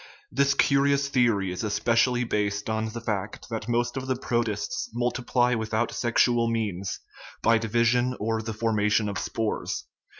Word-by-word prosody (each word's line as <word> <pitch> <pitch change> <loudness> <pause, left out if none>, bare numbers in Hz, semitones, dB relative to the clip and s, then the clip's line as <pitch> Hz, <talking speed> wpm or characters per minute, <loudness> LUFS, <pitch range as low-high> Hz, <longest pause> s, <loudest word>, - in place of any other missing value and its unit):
This 140 +2 +2
curious 140 0 +3
theory 115 -8 +2
is 90 - -4
especially 120 +3 +2
based 105 -1 -1
on 110 0 -1
the 115 +2 -6
fact 105 -2 -4
that 110 0 -4
most 120 +1 0
of 130 -1 -4
the 130 - +1
protists 115 -5 -2
multiply 125 0 +1
without 110 0 -1
sexual 120 0 +2
means, 100 -5 -2 0.4
by 115 0 +4
division 120 +3 +1
or 110 +1 -1
the 110 0 -4
formation 105 -1 +1
of 100 -2 -3
spores. 110 -1 -3
115 Hz, 145 wpm, -26 LUFS, 105-120 Hz, 0.4 s, by